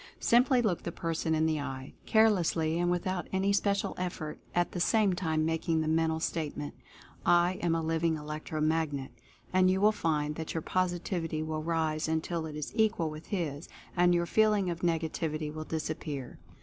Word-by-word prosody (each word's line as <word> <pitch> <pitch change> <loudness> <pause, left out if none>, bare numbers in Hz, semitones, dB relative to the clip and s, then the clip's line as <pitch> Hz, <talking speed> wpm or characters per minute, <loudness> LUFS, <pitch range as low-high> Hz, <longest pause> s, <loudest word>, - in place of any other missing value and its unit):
Simply 245 +1 +4
look 190 -6 0
the 170 - -4
person 165 -1 -1
in 155 0 +2
the 155 -1 +1
eye, 135 -1 -6
carelessly 175 -7 +3
and 175 0 +2
without 180 0 -1
any 195 +1 +1
special 200 0 +1
effort, 175 -4 -4 0.2
at 175 0 +2
the 180 - -4
same 205 +1 +3
time 160 -3 0
making 160 0 0
the 155 - -1
mental 160 0 +1
statement, 150 -3 -3 0.5
"I 175 +1 +3
Am 170 -1 +2
A 165 - -1
Liv 165 0 -1
ing 165 -1 +3
Electro 155 +1 -5
Magnet," 155 -3 0 0.4
and 185 0 +5
you 190 +1 +2
will 210 +2 +5
find 150 -6 0
that 160 0 -5
your 160 - -2
Positivity 175 -3 -1
will 155 0 -3
rise 160 -1 0
until 160 +1 -1
it 150 - -7
is 150 -1 -4
equal 220 -8 +2
with 155 +1 -9
his, 160 -6 -3 0.3
and 175 0 +4
your 170 0 +1
feeling 210 -2 +3
of 170 - -5
negativity 160 -2 -1
will 155 0 -5
disappear. 155 -4 -4
165 Hz, 180 wpm, -30 LUFS, 155-180 Hz, 0.5 s, and